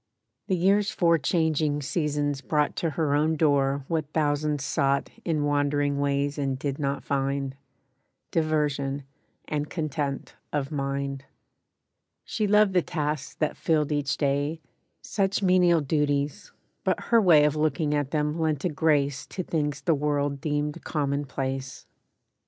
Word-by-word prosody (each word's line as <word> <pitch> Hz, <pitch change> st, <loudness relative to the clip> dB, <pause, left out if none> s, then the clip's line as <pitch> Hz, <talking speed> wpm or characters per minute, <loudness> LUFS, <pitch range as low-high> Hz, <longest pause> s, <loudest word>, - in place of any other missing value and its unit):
The 190 Hz, -, +2 dB
year's 195 Hz, +3 st, +3 dB
four 170 Hz, -2 st, +3 dB
changing 155 Hz, -1 st, +1 dB
seasons 145 Hz, -2 st, -1 dB
brought 150 Hz, +1 st, 0 dB
To 165 Hz, -, 0 dB
her 155 Hz, -1 st, 0 dB
own 155 Hz, +2 st, +2 dB
door 140 Hz, -3 st, +2 dB
what 155 Hz, -3 st, -2 dB
thousands 150 Hz, -2 st, 0 dB
sought 140 Hz, +1 st, +1 dB
In 155 Hz, -3 st, 0 dB
wandering 145 Hz, 0 st, +1 dB
ways 140 Hz, 0 st, 0 dB
and 135 Hz, -2 st, -1 dB
did 140 Hz, +1 st, -3 dB
not 140 Hz, -1 st, -2 dB
find— 135 Hz, -1 st, -1 dB, 0.8 s
Diversion 145 Hz, -3 st, 0 dB, 0.4 s
and 150 Hz, 0 st, -2 dB
content 145 Hz, -4 st, -3 dB, 0.2 s
of 145 Hz, -1 st, -2 dB
mind. 140 Hz, -1 st, -3 dB, 1.0 s
She 215 Hz, -2 st, -1 dB
loved 210 Hz, -1 st, +4 dB
the 180 Hz, -, +4 dB
tasks 150 Hz, -4 st, -3 dB
that 155 Hz, -, -1 dB
filled 155 Hz, -2 st, +1 dB
each 145 Hz, -2 st, 0 dB
day— 145 Hz, +2 st, 0 dB, 0.4 s
Such 200 Hz, 0 st, 0 dB
menial 180 Hz, -3 st, +4 dB
duties; 145 Hz, -1 st, -1 dB, 0.3 s
but -, -, +1 dB
her 230 Hz, -1 st, +6 dB
way 165 Hz, -7 st, +6 dB
Of 150 Hz, 0 st, +1 dB
looking 155 Hz, 0 st, 0 dB
at 145 Hz, -2 st, 0 dB
them 150 Hz, +1 st, -1 dB
lent 155 Hz, -2 st, 0 dB
a -, -, +2 dB
grace 145 Hz, -3 st, +1 dB
To 185 Hz, -, -4 dB
things 150 Hz, -4 st, -2 dB
the 165 Hz, -, +2 dB
world 145 Hz, -1 st, -1 dB
deemed 150 Hz, +1 st, -2 dB
commonplace. 135 Hz, -3 st, -3 dB
145 Hz, 140 wpm, -26 LUFS, 140-160 Hz, 1.0 s, her